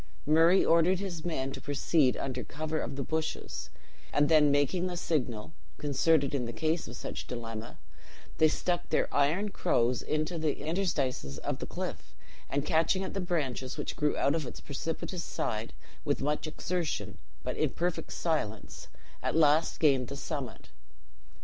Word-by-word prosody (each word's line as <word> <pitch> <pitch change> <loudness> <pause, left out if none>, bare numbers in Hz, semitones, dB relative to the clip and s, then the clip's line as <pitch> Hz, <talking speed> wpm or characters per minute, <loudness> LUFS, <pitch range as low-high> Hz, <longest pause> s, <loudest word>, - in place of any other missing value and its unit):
Murray 165 +5 +6
ordered 170 +3 +5
his 180 -5 -4
men 135 -6 -2
to - - -7
proceed 145 -1 +2
under 130 -2 -3
covert 155 0 -3
of - - -4
the 135 - -2
bushes; 160 +3 -3 0.4
and 145 0 +3
then 155 -2 +6
making 145 +6 +2
the 180 -1 -4
signal 125 -8 -1 0.2
(concerted 145 0 +2
in 125 -4 -1
case 160 +3 0
of - - -7
such - - -6
dilemma), 115 -1 -6 0.6
they 160 - +7
stuck 175 +3 -1
their - - +1
iron 160 +9 +2
crows 120 -9 +2
into 155 +2 -1
the 155 -2 0
interstices 145 - -1
of - - -3
the - - -5
cliff, - - -5 0.3
and 140 +1 0
catching 165 +5 +2
at - - -4
the 195 - -1
branches 140 -8 -2
which - - -3
grew 150 0 +1
out 140 - +3
of 155 -5 -1
its - - -8
precipitous 165 +4 -4
side, 110 +1 -2 0.3
with 145 - 0
much 150 +3 -1
exertion, 155 - -3 0.2
but - - -2
in - - +2
perfect 175 0 -2
silence, 110 - -2 0.3
at - - -1
last 155 0 +4
gained 135 -5 +4
the 140 - -6
summit. 140 -4 -5
150 Hz, 160 wpm, -30 LUFS, 135-165 Hz, 0.6 s, they